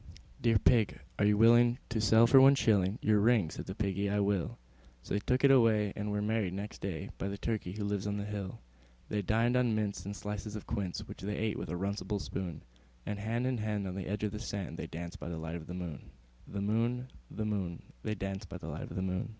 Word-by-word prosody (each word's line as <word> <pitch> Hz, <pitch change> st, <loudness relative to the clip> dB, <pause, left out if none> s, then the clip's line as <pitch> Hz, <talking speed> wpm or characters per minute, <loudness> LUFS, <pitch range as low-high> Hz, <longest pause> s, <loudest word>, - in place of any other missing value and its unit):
III. -, -, -16 dB, 0.3 s
"Dear 115 Hz, -2 st, +4 dB
Pig, 105 Hz, -, +3 dB, 0.2 s
are 105 Hz, -, +4 dB
you 105 Hz, 0 st, +4 dB
willing 120 Hz, +2 st, +6 dB
to 115 Hz, -3 st, 0 dB
sell 110 Hz, +2 st, +6 dB
for 130 Hz, +3 st, +8 dB
one 135 Hz, +1 st, +8 dB
shilling 100 Hz, -5 st, +3 dB
Your 105 Hz, -1 st, +4 dB
ring?" 105 Hz, -6 st, +3 dB
Said -, -, -7 dB
the 95 Hz, -, -5 dB
Piggy, 100 Hz, -1 st, 0 dB
"I 105 Hz, +1 st, +1 dB
will." 100 Hz, -3 st, 0 dB, 0.5 s
So -, -, -5 dB
they 100 Hz, -, +2 dB
took 125 Hz, +6 st, 0 dB
it 140 Hz, -, +8 dB
away, 110 Hz, -6 st, +4 dB
and 105 Hz, 0 st, -3 dB
were 105 Hz, 0 st, 0 dB
married 105 Hz, -4 st, 0 dB
next 100 Hz, +2 st, -6 dB
day 90 Hz, -6 st, -4 dB
By -, -, -2 dB
the 100 Hz, 0 st, -4 dB
Turkey 105 Hz, -4 st, -2 dB
who 105 Hz, +1 st, -4 dB
lives 100 Hz, -1 st, -1 dB
on 100 Hz, 0 st, -1 dB
the 100 Hz, -, -3 dB
hill. 100 Hz, -2 st, -4 dB, 0.5 s
They 105 Hz, -, 0 dB
dined 115 Hz, +5 st, +2 dB
on 125 Hz, -3 st, +3 dB
mince 100 Hz, -4 st, -1 dB
and 100 Hz, +2 st, -5 dB
slices 105 Hz, +1 st, -5 dB
of 105 Hz, -, -6 dB
quince, 100 Hz, -6 st, -3 dB
Which -, -, -9 dB
they 105 Hz, +1 st, -3 dB
ate 110 Hz, -1 st, -1 dB
with -, -, -5 dB
a 90 Hz, -, -2 dB
runcible 100 Hz, +2 st, -2 dB
spoon; 90 Hz, -4 st, -5 dB, 0.4 s
And 105 Hz, -, -3 dB
hand 115 Hz, +4 st, -1 dB
in 130 Hz, -2 st, 0 dB
hand, 105 Hz, -2 st, -1 dB
on 90 Hz, -, -4 dB
the 95 Hz, 0 st, -5 dB
edge 105 Hz, +2 st, -2 dB
of 105 Hz, -, 0 dB
the 105 Hz, -, -5 dB
sand, 100 Hz, -6 st, -4 dB
They 85 Hz, -, -4 dB
danced 85 Hz, +1 st, -7 dB
by -, -, -5 dB
the 85 Hz, -, -4 dB
light 80 Hz, 0 st, -5 dB
of 80 Hz, -2 st, -7 dB
the 90 Hz, -, -6 dB
moon, 85 Hz, -7 st, -6 dB, 0.4 s
The 100 Hz, -, -4 dB
moon, 120 Hz, +5 st, 0 dB, 0.2 s
The 110 Hz, -, -4 dB
moon, 95 Hz, -5 st, -2 dB, 0.2 s
They 110 Hz, -, -2 dB
danced 95 Hz, -1 st, -4 dB
by -, -, -6 dB
the -, -, -7 dB
light -, -, -5 dB
of 95 Hz, +2 st, -2 dB
105 Hz, 245 wpm, -32 LUFS, 95-110 Hz, 0.5 s, for